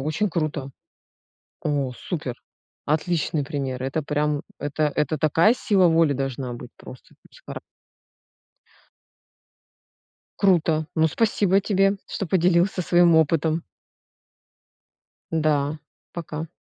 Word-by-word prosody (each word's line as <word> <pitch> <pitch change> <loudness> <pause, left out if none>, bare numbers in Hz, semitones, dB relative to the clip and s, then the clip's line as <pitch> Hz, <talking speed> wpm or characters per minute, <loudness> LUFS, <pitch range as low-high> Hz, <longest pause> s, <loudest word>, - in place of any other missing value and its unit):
очень 155 +9 -1
круто! 155 -4 -2 0.9
О, 140 -4 -1
супер! 145 -8 -5 0.5
Отличный 155 -1 0
пример! 135 -4 -4
Это 135 +4 -2
прям, 150 +1 -1 0.2
это 145 +1 -1
это 150 +1 0
такая 165 - +4
сила 195 -7 +3
воли 165 -3 +3
должна 135 -2 -3
быть 120 0 -9
просто, 130 - -13 0.2
с - - -18
хара - - -6 2.8
Круто. 165 -5 +2
Ну, 160 0 +3
спасибо 200 0 +2
тебе, 195 0 +2
что 195 - -4
поделился 180 +1 +2
своим 175 0 +4
опытом. 160 +1 +2 1.7
Да, 150 -2 0 0.3
пока. 160 -1 -5
155 Hz, 100 wpm, -24 LUFS, 145-175 Hz, 2.8 s, такая